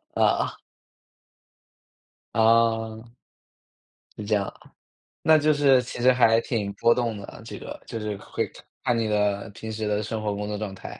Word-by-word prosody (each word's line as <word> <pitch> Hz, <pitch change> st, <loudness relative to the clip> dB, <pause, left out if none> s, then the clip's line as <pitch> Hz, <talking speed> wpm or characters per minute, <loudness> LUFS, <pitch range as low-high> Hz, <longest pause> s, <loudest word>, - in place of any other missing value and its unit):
呃。 -, -, +2 dB, 1.8 s
啊。 115 Hz, 0 st, +2 dB, 1.0 s
是 105 Hz, -, -5 dB
这 110 Hz, -, -1 dB
样 100 Hz, -1 st, 0 dB
啊， -, -, -12 dB, 0.5 s
那 160 Hz, 0 st, +6 dB
就 155 Hz, +1 st, +3 dB
是 135 Hz, -3 st, +5 dB
其 -, -, -7 dB
实 130 Hz, -, +6 dB
还 115 Hz, -3 st, +5 dB
挺 105 Hz, -5 st, -2 dB
波 115 Hz, +3 st, +4 dB
动 115 Hz, -4 st, -1 dB
的， 100 Hz, -, -10 dB
这 -, -, -7 dB
个 -, -, -8 dB
就 115 Hz, -, -5 dB
是 105 Hz, -1 st, -3 dB
会 -, -, -4 dB, 0.3 s
看 120 Hz, -, +2 dB
你 115 Hz, -1 st, 0 dB
的 105 Hz, -1 st, 0 dB
平 110 Hz, +1 st, -8 dB
时 110 Hz, -1 st, -3 dB
的 105 Hz, 0 st, 0 dB
生 110 Hz, +1 st, -4 dB
活 105 Hz, -, 0 dB
工 105 Hz, 0 st, -4 dB
作 105 Hz, 0 st, -3 dB
状 105 Hz, -2 st, -4 dB
态。 -, -, -9 dB
110 Hz, 180 characters per minute, -25 LUFS, 105-115 Hz, 1.8 s, 那